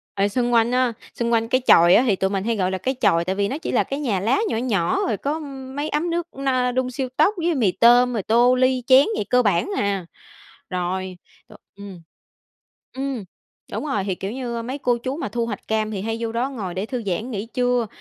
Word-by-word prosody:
rồi 200 Hz, +1 st, +1 dB
xung 240 Hz, +2 st, 0 dB
quanh 230 Hz, +1 st, +3 dB
á 250 Hz, -2 st, +2 dB, 0.2 s
xung 235 Hz, 0 st, -1 dB
quanh 225 Hz, 0 st, +2 dB
cái 255 Hz, +2 st, +1 dB
chòi 170 Hz, +2 st, +7 dB
á 245 Hz, -, +5 dB
hì 215 Hz, -7 st, +2 dB
tụi 190 Hz, +1 st, 0 dB
mình 195 Hz, -1 st, -2 dB
hay 230 Hz, 0 st, 0 dB
gọi 185 Hz, -1 st, 0 dB
là 190 Hz, -, -1 dB
cái 260 Hz, +8 st, -2 dB
chòi, 170 Hz, -6 st, +3 dB
tại 190 Hz, +2 st, -1 dB
vì 200 Hz, 0 st, 0 dB
nó 275 Hz, -, -3 dB
chỉ 320 Hz, -, -5 dB
là -, -, +2 dB
cái 275 Hz, +1 st, -5 dB
nhà 220 Hz, -10 st, -1 dB
lá 230 Hz, -, +1 dB
nhỏ 225 Hz, -, -1 dB
nhỏ, 205 Hz, -9 st, 0 dB
rồi 215 Hz, -4 st, -1 dB
có 300 Hz, +3 st, -2 dB, 0.4 s
mấy 290 Hz, +2 st, -2 dB
ấm 315 Hz, +4 st, -1 dB
nước 340 Hz, 0 st, -2 dB
na 255 Hz, -2 st, 0 dB
đun 255 Hz, 0 st, -1 dB
siêu 255 Hz, +1 st, -3 dB
tốc 350 Hz, +8 st, +4 dB
với 340 Hz, -1 st, 0 dB
mì 215 Hz, -8 st, +2 dB
tôm, 245 Hz, +3 st, +5 dB
rồi 210 Hz, -5 st, -2 dB
tô, 240 Hz, +3 st, +4 dB
ly, 255 Hz, -1 st, +2 dB
chén 265 Hz, +1 st, +7 dB
vậy, -, -, -2 dB
cơ 250 Hz, 0 st, +4 dB
bản 205 Hz, -, +1 dB
à. 200 Hz, -3 st, -1 dB, 0.7 s
Rồi 185 Hz, 0 st, -3 dB, 0.3 s
t -, -, -19 dB, 0.2 s
ừm, 195 Hz, -4 st, -10 dB, 0.9 s
ừm, 265 Hz, -5 st, -4 dB, 0.5 s
đúng -, -, -3 dB
rồi, 205 Hz, -9 st, -1 dB
hì, 190 Hz, -2 st, -1 dB
kiểu 195 Hz, +4 st, -5 dB
như, 240 Hz, -3 st, -4 dB
mấy 255 Hz, +4 st, -5 dB
cô 245 Hz, -3 st, +1 dB
chú 260 Hz, +4 st, -4 dB
mà 325 Hz, -, -4 dB
thu 230 Hz, +2 st, -2 dB
hoạch 205 Hz, -3 st, -7 dB
cam 220 Hz, 0 st, 0 dB
thì 195 Hz, -2 st, -4 dB
hay 225 Hz, +1 st, -2 dB
vô 225 Hz, -1 st, -3 dB
đó 245 Hz, +4 st, -1 dB
ngồi 200 Hz, -9 st, -5 dB
để 195 Hz, +3 st, -3 dB
thư 250 Hz, -2 st, -4 dB
giãn 215 Hz, +7 st, -2 dB
nghỉ 210 Hz, 0 st, -4 dB
trưa, 245 Hz, -2 st, +1 dB
235 Hz, 245 wpm, -22 LUFS, 200-255 Hz, 0.9 s, chòi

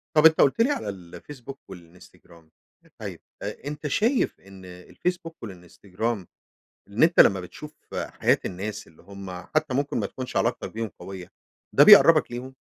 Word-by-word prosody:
طب 155 Hz, -, +5 dB
أنت 160 Hz, 0 st, +7 dB
قلت 140 Hz, +11 st, +3 dB
لي 270 Hz, +5 st, +3 dB
على 105 Hz, -, -3 dB
الفيسبوك 115 Hz, +9 st, -10 dB
والإنستجرام. 85 Hz, -2 st, -16 dB, 0.5 s
طيب -, -, -7 dB, 0.2 s
أ 140 Hz, -, -7 dB
أنت 150 Hz, 0 st, -5 dB
شايف 230 Hz, -, 0 dB
إن 95 Hz, -1 st, -15 dB
الفيسبوك 165 Hz, -, -5 dB
والإنستجرام 95 Hz, +2 st, -5 dB, 0.6 s
إن 100 Hz, +6 st, -2 dB
أنت 165 Hz, +1 st, +5 dB
لما 95 Hz, -1 st, +6 dB
بتشوف 150 Hz, -, -11 dB, 0.2 s
حياة -, -, 0 dB
الناس 100 Hz, +3 st, -5 dB
اللي 80 Hz, -, -21 dB
هم 100 Hz, -1 st, -10 dB
حتى 155 Hz, -, -2 dB
ممكن 140 Hz, +1 st, -1 dB
ما -, -, -1 dB
تكونش 130 Hz, -1 st, -8 dB
علاقتَك -, -, -1 dB
بيهم 110 Hz, -1 st, -4 dB
قوية، 95 Hz, -2 st, -9 dB, 0.4 s
ده -, -, +7 dB
بيقربك -, -, +8 dB
ليهم؟ 130 Hz, +2 st, -7 dB
110 Hz, 150 wpm, -25 LUFS, 90-150 Hz, 0.6 s, بيقربك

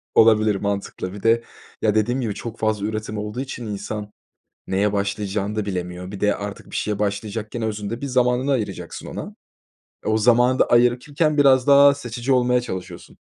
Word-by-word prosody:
Olabilir, 110 Hz, -2 st, +5 dB
mantıklı. 100 Hz, -2 st, -3 dB
Bir 100 Hz, -, -9 dB
de, 115 Hz, +1 st, +3 dB, 0.4 s
ya, 110 Hz, -1 st, +2 dB
dediğim 120 Hz, +5 st, +1 dB
gibi 110 Hz, -4 st, -2 dB
çok 115 Hz, +3 st, -7 dB
fazla 110 Hz, -2 st, 0 dB
üretim 110 Hz, 0 st, -4 dB
olduğu 105 Hz, +3 st, -4 dB
için 130 Hz, -3 st, -6 dB
insan 105 Hz, 0 st, -5 dB, 0.6 s
neye 100 Hz, +2 st, +1 dB
başlayacağını 100 Hz, +1 st, -2 dB
da 105 Hz, -, 0 dB
bilemiyor. 90 Hz, -1 st, -4 dB
Bir 100 Hz, -, -8 dB
de 105 Hz, 0 st, +3 dB
artık 105 Hz, 0 st, -7 dB
bir -, -, -4 dB
şeye 105 Hz, -1 st, -1 dB
başlayacakken 105 Hz, +2 st, -3 dB
özünde 110 Hz, +1 st, -3 dB
bir 140 Hz, -, -3 dB
zamanını 125 Hz, +1 st, +2 dB
ayıracaksın 120 Hz, -6 st, -4 dB
ona. -, -, -5 dB, 0.8 s
Eee, -, -, +1 dB
o 110 Hz, -, +3 dB
zamanı 120 Hz, +3 st, +4 dB
da -, -, +5 dB
ayırırken 135 Hz, +6 st, +2 dB
biraz 135 Hz, -2 st, +5 dB
daha 140 Hz, 0 st, +7 dB
seçici 125 Hz, -1 st, -4 dB
olmaya 125 Hz, 0 st, +3 dB
çalışıyorsun. 95 Hz, -7 st, -7 dB
110 Hz, 170 wpm, -22 LUFS, 105-125 Hz, 0.8 s, daha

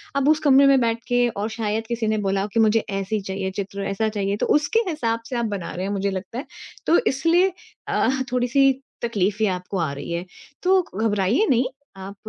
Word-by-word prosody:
अब 280 Hz, +1 st, +2 dB
उस 310 Hz, 0 st, +4 dB
कमरे 280 Hz, -2 st, +5 dB
में 275 Hz, -1 st, +5 dB
बैठ 230 Hz, 0 st, +1 dB
के 245 Hz, 0 st, +3 dB
और 210 Hz, 0 st, -3 dB
शायद 220 Hz, 0 st, -2 dB
किसी 235 Hz, -2 st, -2 dB
ने 215 Hz, -, +1 dB
बोला 195 Hz, +1 st, +1 dB
कि 230 Hz, -, +2 dB
मुझे 220 Hz, 0 st, +4 dB
ऐसी 195 Hz, +1 st, -2 dB
चाहिए 190 Hz, 0 st, -4 dB
चित्र, 200 Hz, 0 st, -4 dB
ऐसा 215 Hz, +3 st, 0 dB
चाहिए 200 Hz, -1 st, -2 dB
तो -, -, -1 dB
उसके 375 Hz, +10 st, +1 dB
हिसाब 230 Hz, -8 st, -1 dB
से 250 Hz, -, -3 dB
आप 235 Hz, -, 0 dB
बना 200 Hz, -5 st, -4 dB
रहे 185 Hz, +2 st, -3 dB
हैं, 200 Hz, -, -2 dB
मुझे 200 Hz, 0 st, -1 dB
लगता 190 Hz, +5 st, -6 dB
है, 280 Hz, -, -6 dB, 0.4 s
तो 340 Hz, -, +5 dB
इसलिए 335 Hz, +7 st, +3 dB, 0.3 s
अ, -, -, +1 dB, 0.2 s
थोड़ी-सी 255 Hz, +2 st, +3 dB, 0.3 s
तकलीफें 210 Hz, -2 st, 0 dB
आपको 180 Hz, +1 st, -4 dB
आ 160 Hz, -4 st, 0 dB
रही 140 Hz, +4 st, -7 dB
हैं। 170 Hz, +1 st, -3 dB, 0.4 s
तो 375 Hz, +1 st, +4 dB
घबराइए 215 Hz, -, +2 dB
नहीं 255 Hz, 0 st, +3 dB, 0.3 s
आप 195 Hz, +1 st, -8 dB
220 Hz, 205 wpm, -23 LUFS, 195-255 Hz, 0.4 s, कमरे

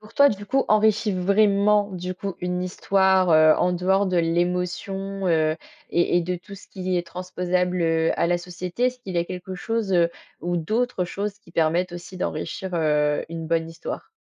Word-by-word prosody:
pour 215 Hz, +1 st, -16 dB
toi, 280 Hz, +3 st, +7 dB
du 205 Hz, -3 st, -4 dB
coup, 270 Hz, +6 st, +1 dB
enrichi 215 Hz, 0 st, +3 dB
vraiment, 200 Hz, +2 st, +3 dB
du 180 Hz, 0 st, -4 dB
coup, 195 Hz, +1 st, -5 dB
une 180 Hz, 0 st, -2 dB
histoire, 190 Hz, 0 st, +2 dB
heu, 155 Hz, 0 st, +7 dB
en 180 Hz, -, +2 dB
dehors 190 Hz, +3 st, +2 dB
de 185 Hz, -1 st, 0 dB
l'émotion, 180 Hz, +3 st, -1 dB
heu 155 Hz, -2 st, +2 dB, 0.3 s
et 175 Hz, 0 st, +2 dB
et -, -, +4 dB
de 180 Hz, +1 st, -2 dB
tout 200 Hz, +3 st, -12 dB
ce 195 Hz, -, -13 dB
qui 185 Hz, -1 st, -2 dB
est 175 Hz, -1 st, -2 dB
transposable, 180 Hz, +1 st, -1 dB
heu, 165 Hz, 0 st, +2 dB
à -, -, +3 dB
la 175 Hz, +1 st, +1 dB
société, 180 Hz, +5 st, -4 dB
est-ce 250 Hz, 0 st, 0 dB
qu'il 195 Hz, -7 st, -8 dB
y -, -, +2 dB
a 170 Hz, -, +1 dB
quelque 180 Hz, +1 st, -7 dB
chose, 220 Hz, +2 st, -2 dB
heu, 170 Hz, -2 st, +4 dB, 0.3 s
ou 175 Hz, +1 st, -1 dB
d'autres 215 Hz, +4 st, 0 dB
choses 200 Hz, +3 st, -4 dB
qui -, -, -20 dB
permettent 170 Hz, +3 st, +1 dB
aussi 175 Hz, +2 st, -9 dB
d'enrichir, 190 Hz, +1 st, -4 dB
heu, 150 Hz, -2 st, +1 dB
une 165 Hz, 0 st, -6 dB
bonne 165 Hz, 0 st, 0 dB
histoire? 165 Hz, 0 st, -7 dB
180 Hz, 195 wpm, -24 LUFS, 170-195 Hz, 0.3 s, toi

